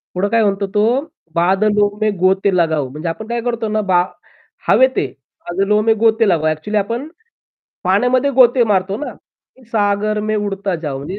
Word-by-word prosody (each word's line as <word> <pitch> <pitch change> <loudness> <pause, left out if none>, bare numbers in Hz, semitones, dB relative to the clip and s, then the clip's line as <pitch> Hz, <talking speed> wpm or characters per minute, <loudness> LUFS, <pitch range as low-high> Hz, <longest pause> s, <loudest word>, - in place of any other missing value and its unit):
पुढं 185 +3 0
काय 230 0 +2
म्हणतो 200 -1 0
तो 210 - +3 0.5
बादलो 205 +4 +2
में 215 0 +2
गोते 190 +1 +2
लगाओ 160 -5 +1
म्हणजे 150 +6 -6
आपण 215 +7 -6
काय 235 0 -2
करतो 235 -1 -2
ना, 215 0 0
बा 185 -3 +2 0.6
हवेत 260 0 +4
आहे, 140 - +1 0.3
बादलो 195 +4 0
में 225 +1 +3
गोते 225 0 +3
लगा 155 -3 +2
एक्चुअली 185 +8 -3
आपण 230 +7 -2 0.8
पाण्यामध्ये 245 +9 +2
गोते 250 -1 +5
मारतो 195 -2 0
ना, - - -7 0.6
सागर 210 0 0
में 215 - +1
उडता 200 -2 -2
जाऊ. 140 -2 -4
205 Hz, 160 wpm, -17 LUFS, 185-220 Hz, 0.8 s, गोते